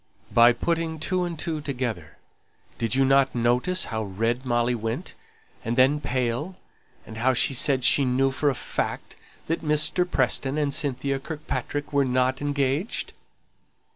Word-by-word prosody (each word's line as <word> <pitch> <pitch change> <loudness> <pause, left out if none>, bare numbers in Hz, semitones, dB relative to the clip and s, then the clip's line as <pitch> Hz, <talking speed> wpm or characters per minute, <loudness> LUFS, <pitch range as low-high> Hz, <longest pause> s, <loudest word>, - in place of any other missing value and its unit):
"By 120 +1 +7
putting 165 +4 -1
two 180 +3 0
and 170 -2 -5
two 155 -1 -3
together. 120 - -4 0.6
Didn't 115 +1 0
you 135 0 +3 0.3
notice 125 +10 +1
how 110 -1 -3
red 115 +5 -2
Molly 120 0 +1
went, 115 -1 -4 0.5
and 115 +1 -2
then 135 +4 +4
pale, 130 +8 -2 0.5
and 110 - -10
how 130 +3 +2
she 135 - +2
said 135 -1 +2
she 140 - +5
knew 135 +1 +2
for 145 +2 +1
a 135 - -1
fact - - -4 0.3
that 165 - -2
Mr. 155 +4 +2
Preston 135 0 0
and 145 -2 0
Cynthia 140 -2 -1
Kirkpatrick 145 0 -5
were 140 0 +4
not 130 +1 0
engaged?" 145 - -1
135 Hz, 145 wpm, -25 LUFS, 120-150 Hz, 0.6 s, By